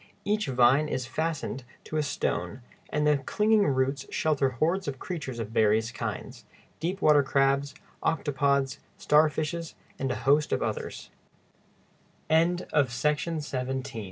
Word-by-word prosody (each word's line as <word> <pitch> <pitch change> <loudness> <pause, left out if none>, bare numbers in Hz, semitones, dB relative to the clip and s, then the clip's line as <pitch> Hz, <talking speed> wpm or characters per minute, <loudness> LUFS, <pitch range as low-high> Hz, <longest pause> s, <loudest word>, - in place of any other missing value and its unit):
] - - -37
Each 210 -3 0
vine 130 +3 +4
is 130 -4 -2
fastened 150 0 -3 0.2
to - - -7
a - - +2
stone, 130 -2 -2 0.3
and 150 0 0
the 150 -1 +4
clinging 210 +8 +2
roots 135 0 0
shelter 145 -4 +1
hordes 165 +9 0
of 135 -2 -3
creatures 145 -7 -5
of 115 -3 -4
various 110 +1 +2
kinds—deep 175 +7 -6
water 150 -1 +6
crabs, 140 +1 +1 0.3
octopods, 140 -3 +1 0.2
starfishes, 155 +2 +1 0.2
and 135 - -1
a 125 - -4
host 145 +2 +3
140 Hz, 110 wpm, -28 LUFS, 130-155 Hz, 0.3 s, water